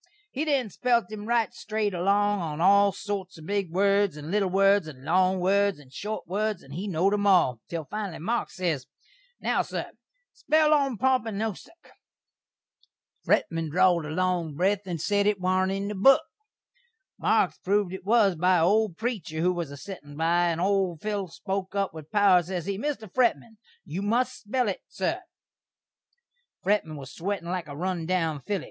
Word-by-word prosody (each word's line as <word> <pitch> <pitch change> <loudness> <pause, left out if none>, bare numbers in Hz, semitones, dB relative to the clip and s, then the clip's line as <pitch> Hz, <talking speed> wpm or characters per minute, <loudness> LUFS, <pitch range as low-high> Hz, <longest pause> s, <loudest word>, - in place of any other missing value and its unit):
He 290 +4 -2
then 270 -8 0
spelt 235 -1 +1
him 210 0 -7
right 235 -2 +1
strate 215 -1 -2
along 200 +3 +2
on 155 -2 -4
all 200 +3 +5
sorts 195 -2 -5
of 160 - -12
big 200 -1 -1
words, 200 0 +2
and 150 +2 -7
little 200 -2 +1
words, 195 -1 +3
and 135 -3 -11
long 185 +3 +2
words, 200 +2 +2
and 135 -3 -17
short 210 +8 -5
words, 210 +2 -2
and 135 - -12
he 185 +7 -4
knowd 190 +2 +1
'em 205 0 +1
all, 175 - +4
til 165 -2 -4
finally 205 -1 -5
Marks 230 +9 -2
ses, 165 -8 -2 0.5
"Now, - - +1
sur, - - -5 0.4
spell 310 0 +2
'Ompompynusuk.'" 255 - -1 1.3
Fretman 165 -2 +1
drawd 175 -1 +3
a - - -6
long 175 -2 -1
breth 195 +4 0
and 175 -3 -3
sed 205 +5 +1
it 210 -2 +1
warn't 185 +1 +1
in 195 +1 -2
the 210 - -3
book. 240 +8 +5 1.0
Marks - - +2
proved 200 -1 0
it 190 - -7
was 205 -2 +3
by 180 +3 +3
a 165 - +3
old 205 -2 +2
preecher 215 -9 -3
who 180 +2 +2
was 170 -4 -4
a 140 - -9
settin' 145 -4 -10
by, 170 +2 +2
and 165 -1 -1
old 190 -3 +1
Phil 205 -3 -2
spoke 190 +3 -4
up 200 -3 0
with 155 -1 -10
power, 200 -4 +5
ses 175 -1 -5
he, 200 - -2
"Mr. 270 -4 -3
Fretman, 235 +1 0 0.3
you 175 +2 -4
must 230 +5 0
spell 245 +3 0
it, 195 - -3
sur." - - -2 1.4
Fretman 185 -6 0
was 135 -2 -9
a - - -14
swettin' 190 -2 -3
like 180 -3 -3
a 145 -1 -8
run 175 -1 -2
down 165 -5 0
filly. 200 +7 -2
190 Hz, 180 wpm, -26 LUFS, 170-205 Hz, 1.4 s, all